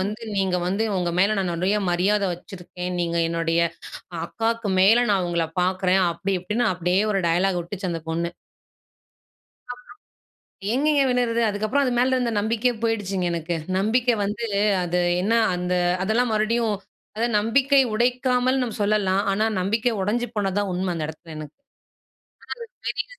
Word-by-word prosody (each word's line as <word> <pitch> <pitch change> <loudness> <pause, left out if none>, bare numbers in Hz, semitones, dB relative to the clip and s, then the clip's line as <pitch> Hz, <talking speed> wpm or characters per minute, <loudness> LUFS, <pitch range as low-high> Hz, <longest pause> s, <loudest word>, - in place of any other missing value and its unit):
வந்து 210 +4 -3
நீங்க 190 -2 +1
வந்து 195 +4 0
உங்க 175 -1 0
மேலே 200 +3 +4
நான் 185 -3 -1
நிறைய 185 +5 +1
மரியாதை 195 +4 +2
வச்சிருக்கேன், 180 0 -8
நீங்க 170 0 -1
என்னுடைய 165 0 0 0.6
அக்காக்கு 225 +2 -2
மேலே 225 +6 +5
நான் 185 -2 +1
உங்கள 170 -1 0 0.2
பார்க்குறேன்" 185 +1 +2
அப்படி 195 +3 -2
இப்படின்னு 210 +7 -1
அப்படியே 180 +2 +1
ஒரு 195 - +1
டயலாக் 180 +1 +1
விட்டுச்சு 185 +1 -5
அந்த 165 - -5
பொண்ணு. 170 +1 -1 1.4
அப்புறம் 245 0 -9 0.9
எங்கேங்க 290 +2 +2
விடறது. 240 -2 +1
அதுக்கப்புறம் 215 +7 0
அது 250 - 0
மேல 260 +1 +2
இருந்த 245 -2 0
நம்பிக்கையே 230 +3 +1
போயிடுச்சுங்க 200 -5 -1
எனக்கு. 170 0 -2 0.2
நம்பிக்கை 235 +4 +2
வந்து 210 +4 -3 0.4
அது 175 +1 0 0.2
என்ன 215 +4 +1 0.2
அந்த 180 0 -2 0.3
அதெல்லா 220 +5 +2
மறுபடியும் 220 +1 +1 0.4
அதாவது 235 +2 0
நம்பிக்கை 270 +6 +3
உடைக்காமல் 250 +2 +1
நாம் 235 -4 -3
சொல்லலாம். 200 -2 +2
ஆனா, 215 +3 +1
நம்பிக்கை 220 +6 +1
உடைஞ்சு 235 +5 0
போனது 195 -2 -1
தான் 205 -1 0
உண்மை 185 +1 -2
அந்த 160 -2 -3
இடத்தில 160 +1 -10
எனக்கு. 155 - -10 1.1
அது - - -60
பெரிய - - -2
200 Hz, 145 wpm, -23 LUFS, 180-230 Hz, 1.4 s, மேலே